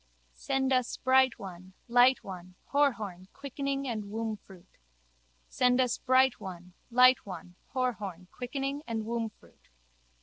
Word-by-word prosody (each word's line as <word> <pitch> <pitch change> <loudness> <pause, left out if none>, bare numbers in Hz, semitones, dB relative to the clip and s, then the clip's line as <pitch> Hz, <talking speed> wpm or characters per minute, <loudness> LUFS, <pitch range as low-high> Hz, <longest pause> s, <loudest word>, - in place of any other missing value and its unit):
Send 265 - 0
us 255 -2 +1
bright 260 -1 +4
one, 185 -3 -10
light 245 +2 +5
one, 185 -1 -9 0.2
Horhorn, 215 -11 +1
quickening 275 0 -3
and 220 -4 -3
wombfruit. 210 -4 -7 0.7
Send 250 0 +2
us 250 -2 +2
bright 260 0 +3
one, 180 -3 -9 0.2
light 250 +1 +6
one, 180 -2 -9 0.2
Horhorn, 210 -9 -2
quickening 275 +3 -3
and 225 -2 -2
wombfruit. 225 -1 -6
235 Hz, 115 wpm, -30 LUFS, 195-260 Hz, 0.7 s, light